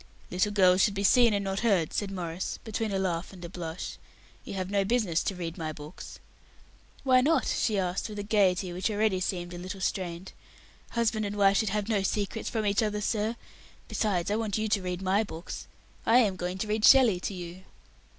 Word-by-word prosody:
"Little 185 +3 +1
girls 185 -2 +5
should 205 -1 +3
be 200 - -1
seen 240 +3 +6
and 200 -1 0
not 195 0 -2
heard," 195 -8 +2
said 205 - -1
Maurice, 180 -2 -4
between 220 -1 -2
a 195 - 0
laugh 180 -2 -2
and 180 -3 -10
a - - -7
blush. 170 -1 -6 0.5
"You - - -7
have 185 0 -3
no 200 -1 +2
business 195 -6 +1
to 195 - -1
read 170 -2 -5
my 160 -1 -3
books." 150 +2 -10 0.9
"Why 255 -2 +5
not?" 300 +1 +2
she 215 -3 0
asked, 185 +2 -1
with 210 - -7
a 205 - -3
gaiety 190 -3 +2
which 185 +4 -1
already 210 -2 +1
seemed 175 -1 -3
a 175 - -6
little 185 +2 -6
strained; 185 -1 -3 0.6
"husband 225 -2 0
and 200 - -5
wife 200 -1 +4
should 220 - +1
have 210 +1 -1
no 215 -3 +1
secrets 205 +3 -2
from 220 -2 -2
each 200 +1 +2
other, 210 -1 -1
sir. 215 +2 -1 0.5
Besides, 200 -4 0
I 210 - +1
want 220 -2 -1
you 220 0 -1
to 205 -2 +2
read 180 0 -4
my 195 +3 +2
books. 170 -5 -8 0.4
I 230 - +5
am 210 -6 +3
going 180 0 -3
to 215 - -3
read 210 0 -1
Shelley 245 -9 +7
to 195 - -4
you." 175 0 -8
195 Hz, 210 wpm, -28 LUFS, 180-215 Hz, 0.9 s, Shelley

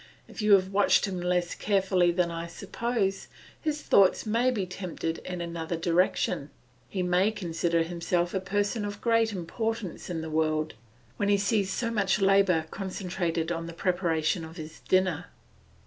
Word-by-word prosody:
If - - -8
you 210 -1 +5
have 190 0 +4
watched 205 +1 +4
him 185 -3 -4
less 180 0 0
carefully 190 -3 +2
than 175 -1 0
I 165 0 -4
suppose, 200 +2 -2 0.3
his 300 -1 -2
thoughts 195 +2 +4
may 230 +4 +2
be 215 -7 -1
tempted 180 -3 -4
in 180 -1 -6
another 170 0 -3
direction; 170 -3 +1 0.4
he 185 -2 -2
may 180 +3 +3
consider 170 -4 0
himself 175 +1 -1
a 190 - +1
person 205 +3 -1
of 205 0 -5
great 230 -1 +2
importance 205 +1 -4
in 165 -2 -3
the 160 0 -6
world, 155 0 0 0.4
when 205 - 0
he 200 - +5
sees 200 -1 +1
so 230 -1 -1
much 205 -3 +1
labour 195 -4 +4
concentrated 180 -4 -2
on 165 -1 -3
the 170 - -7
preparation 170 -2 0
of 160 +2 -10
his 155 -1 -8
dinner. 185 -3 +2
185 Hz, 165 wpm, -28 LUFS, 170-200 Hz, 0.4 s, you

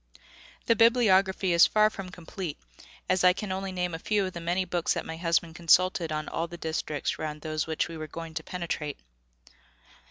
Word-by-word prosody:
The 230 - +4
bibliography 195 -6 +4
is 170 - +7
far 215 0 +3
from 195 -3 -7
complete, 175 -2 -6 0.5
as 185 0 +2
I 180 0 +7
can 200 +2 -5
name 185 - -1
only 190 -2 -2
a 165 -2 -4
few 205 +2 +1
of 185 - -5
the 170 - -6
many 175 +3 0
books 175 -1 0
that - - -3
my 160 - -5
husband 165 0 0
consulted 170 0 +3
on 155 0 -3
all 165 - -2
the 175 - -9
districts 160 -2 -3
round 150 -1 -4
those 155 0 -2
which 160 -1 -1
we 165 -1 -8
were 155 0 -6
going 165 +1 -8
to 160 +1 -4
penetrate. 165 -5 -4
175 Hz, 195 wpm, -28 LUFS, 160-185 Hz, 0.5 s, is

